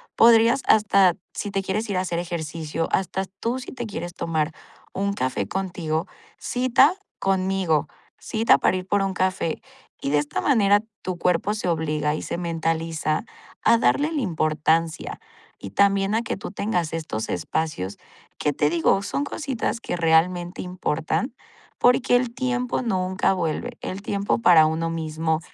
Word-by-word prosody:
podrías 230 Hz, +2 st, +6 dB
hasta, 200 Hz, -4 st, +5 dB, 0.2 s
si 205 Hz, -, -4 dB
te 195 Hz, -1 st, -2 dB
quieres 210 Hz, +3 st, -2 dB
ir 195 Hz, -, 0 dB
a 185 Hz, -, +2 dB
hacer 175 Hz, -2 st, -2 dB
ejercicio, 165 Hz, -2 st, -3 dB
hasta 190 Hz, +1 st, 0 dB
tú 230 Hz, +6 st, -3 dB
si 255 Hz, -, -8 dB
te 240 Hz, -3 st, -5 dB
quieres 175 Hz, -4 st, -5 dB
tomar 160 Hz, -2 st, -1 dB, 0.4 s
un 200 Hz, +1 st, -1 dB
café 130 Hz, -, -2 dB
contigo, 175 Hz, -, -2 dB, 0.3 s
cita 255 Hz, +5 st, +3 dB, 0.3 s
conmigo, 185 Hz, -6 st, +1 dB, 0.3 s
cita 225 Hz, +1 st, +3 dB
para 185 Hz, -, +2 dB
ir 185 Hz, -, -5 dB
por 205 Hz, 0 st, +2 dB
un 195 Hz, -1 st, -1 dB
café. 185 Hz, -3 st, -1 dB, 0.4 s
Y, 140 Hz, -, -2 dB
de 150 Hz, -, +4 dB
esta 145 Hz, 0 st, -2 dB
manera, 205 Hz, -6 st, +4 dB, 0.2 s
tu 185 Hz, -2 st, -4 dB
cuerpo 180 Hz, +5 st, +1 dB
se 210 Hz, -, -3 dB
obliga 155 Hz, -3 st, 0 dB
y 155 Hz, -, -3 dB
se -, -, -4 dB
mentaliza 165 Hz, 0 st, -1 dB, 0.4 s
a 230 Hz, -, +5 dB
darle 295 Hz, +5 st, +2 dB
la 295 Hz, -4 st, -1 dB
importancia 160 Hz, -2 st, 0 dB, 0.4 s
y -, -, -8 dB
también 200 Hz, 0 st, +3 dB
a 225 Hz, -, +2 dB
que 230 Hz, -, -3 dB
tú 195 Hz, -, -7 dB
tengas 180 Hz, -7 st, -1 dB
estos 155 Hz, -9 st, -3 dB
espacios 100 Hz, -, -2 dB, 0.4 s
que, 150 Hz, -, 0 dB
te 150 Hz, +1 st, +2 dB
digo, 170 Hz, +4 st, +2 dB
son 275 Hz, +8 st, -2 dB
cositas 270 Hz, -5 st, -3 dB
que -, -, -3 dB
realmente 175 Hz, +2 st, +2 dB
importan 180 Hz, -, -2 dB, 0.5 s
porque 245 Hz, 0 st, +4 dB
el 245 Hz, -1 st, +1 dB
tiempo 250 Hz, -1 st, -1 dB
nunca 185 Hz, -3 st, +1 dB
vuelve, 180 Hz, +7 st, -2 dB
el 190 Hz, +2 st, -5 dB
tiempo 200 Hz, -1 st, 0 dB
para 165 Hz, -7 st, +6 dB
uno 165 Hz, +1 st, -1 dB
mismo, 160 Hz, 0 st, -1 dB
185 Hz, 155 wpm, -24 LUFS, 160-210 Hz, 0.5 s, podrías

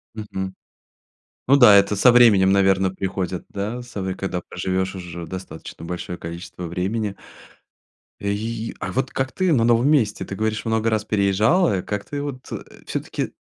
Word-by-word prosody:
Мгм. 95 Hz, -3 st, -5 dB, 0.9 s
Ну 135 Hz, -, +6 dB
да. 120 Hz, -6 st, +8 dB
Это 100 Hz, +1 st, +4 dB
со 120 Hz, +5 st, +6 dB
временем, 105 Hz, -6 st, +6 dB
наверно, 95 Hz, -1 st, +3 dB
приходит, 95 Hz, -1 st, -3 dB
да 105 Hz, +5 st, -4 dB
сов 95 Hz, -6 st, -5 dB
когда 95 Hz, -2 st, -3 dB
проживешь 95 Hz, +2 st, -2 dB
уже 85 Hz, -2 st, -7 dB
достаточно 85 Hz, -2 st, -8 dB
большое 90 Hz, +1 st, -5 dB
количество 85 Hz, +1 st, -7 dB
времени. 100 Hz, +4 st, -2 dB, 1.1 s
И, 110 Hz, +3 st, -3 dB
а -, -, -4 dB
вот 130 Hz, +1 st, -1 dB
как 130 Hz, 0 st, -2 dB
ты 185 Hz, -2 st, +1 dB
на 120 Hz, -5 st, +3 dB
новом 120 Hz, +3 st, +4 dB
месте? 120 Hz, -9 st, +2 dB
Ты 95 Hz, -, -6 dB
говоришь, 110 Hz, +1 st, -2 dB
много 110 Hz, 0 st, +1 dB
раз 110 Hz, -1 st, 0 dB
переезжала. 105 Hz, -, +2 dB
Как 105 Hz, -1 st, -4 dB
ты 145 Hz, 0 st, -4 dB
вот, 135 Hz, -3 st, -7 dB
э, -, -, -5 dB, 0.2 s
всё-таки -, -, -4 dB
100 Hz, 155 wpm, -22 LUFS, 95-115 Hz, 1.1 s, да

